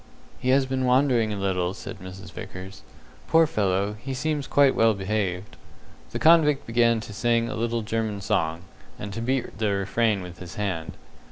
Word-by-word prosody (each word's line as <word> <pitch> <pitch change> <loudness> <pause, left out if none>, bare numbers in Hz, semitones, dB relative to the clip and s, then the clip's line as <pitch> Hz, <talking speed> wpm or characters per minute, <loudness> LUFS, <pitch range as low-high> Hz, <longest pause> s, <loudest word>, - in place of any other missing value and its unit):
"He 130 - -2
has 135 +1 +4
been 130 0 -1
wandering 125 -3 +3
a 105 - -3
little," 95 -2 -1
said 110 - -8
Mrs. 95 +1 -10
Vickers. 95 +1 -9 0.5
"Poor 165 0 +5
fellow, 100 -6 0
he 135 +3 -5
seems 150 +1 -2
quite 140 -2 +4
well 115 -1 +3
behaved." 95 -1 -2 0.5
The - - -4
convict 150 -4 +4
began 115 0 +3
to 105 - -9
sing 115 +2 +1
a - - -4
little 115 0 -1
German 110 -1 -2
song, 85 -5 -1 0.3
and 100 -1 -6
to 115 - -4
beat 125 -3 -2
the 110 -2 +1
refrain 100 +1 0
with 90 -1 -10
his 85 -3 -9
hand. 95 -6 -3
110 Hz, 175 wpm, -25 LUFS, 95-125 Hz, 0.5 s, Poor